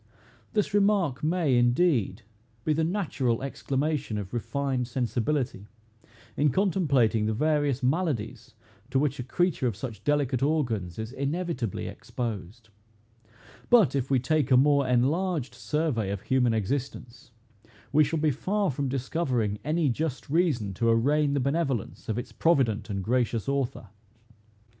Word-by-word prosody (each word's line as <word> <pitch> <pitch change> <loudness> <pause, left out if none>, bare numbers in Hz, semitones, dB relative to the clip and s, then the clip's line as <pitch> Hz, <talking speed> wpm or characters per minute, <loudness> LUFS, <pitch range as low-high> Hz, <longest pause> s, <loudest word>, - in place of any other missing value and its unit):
This 210 -2 0
remark 200 -10 +2
may, 160 -4 +2
indeed, 120 - +2 0.4
be 155 - +1
the 160 +2 0
natural 150 - -1
exclamation 140 -2 -2
of 100 0 -6
refined 130 +1 -2
sensibility, 125 -2 -2 0.7
in 145 +1 +3
contemplating 140 - +2
the 110 - 0
various 145 -1 +1
maladies 125 - -1 0.3
to 135 - 0
which 145 0 0
a - - -2
creature 155 +1 0
of 115 - -2
such 110 -4 -7
delicate 140 -2 +1
organs 120 - 0
is 110 +1 -5
inevitably 140 - -3
exposed; 110 -1 -6 1.0
but, 230 -11 +5
if 135 -1 -1
we 135 - +3
take 140 +2 +1
a 130 - +6
more 140 0 +4
enlarged 140 +4 +1
survey 120 -4 -1
of 100 -1 -3
human 125 -2 +2
existence, 120 +1 -4 0.6
we 155 +3 +5
shall 160 +3 -1
be 155 0 +2
far 195 - 0
from 140 +1 -2
discovering 125 -6 -1
any 155 +2 +1
just 140 +2 -3
reason 145 - +1
to 115 +5 0
arraign 140 +5 +2
the - - +2
benevolence 135 -6 -2
of 110 - -1
its 120 - -5
provident 115 -11 +1
and 100 -2 -3
gracious 120 +1 0
Author. 135 -6 -2
135 Hz, 140 wpm, -27 LUFS, 115-155 Hz, 1.0 s, a